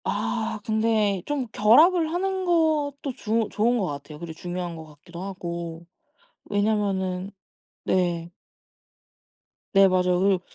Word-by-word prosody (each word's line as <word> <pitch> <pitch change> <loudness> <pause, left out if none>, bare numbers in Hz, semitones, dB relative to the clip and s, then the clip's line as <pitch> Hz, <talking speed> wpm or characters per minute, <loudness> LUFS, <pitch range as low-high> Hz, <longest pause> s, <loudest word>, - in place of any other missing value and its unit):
아 220 -1 -2
근데 215 -3 +1
좀 285 -4 -2
결합을 315 - +5
하는 380 +2 -1
것도 300 -5 +1
주 220 +1 0
좋은 235 +3 +2
것 205 - 0
같아요. 145 -1 -7
그리고 170 -1 -7
중요한 175 +1 -5
것 160 -1 -9
같기도 155 +3 -12
하고. 170 -3 -6 0.6
왜냐면은 200 -3 -1 0.5
네. 175 -2 0 1.4
네 195 -1 +7
맞아요. 180 -1 +2
그리고 190 -1 +2
200 Hz, 240 characters per minute, -25 LUFS, 175-235 Hz, 1.4 s, 네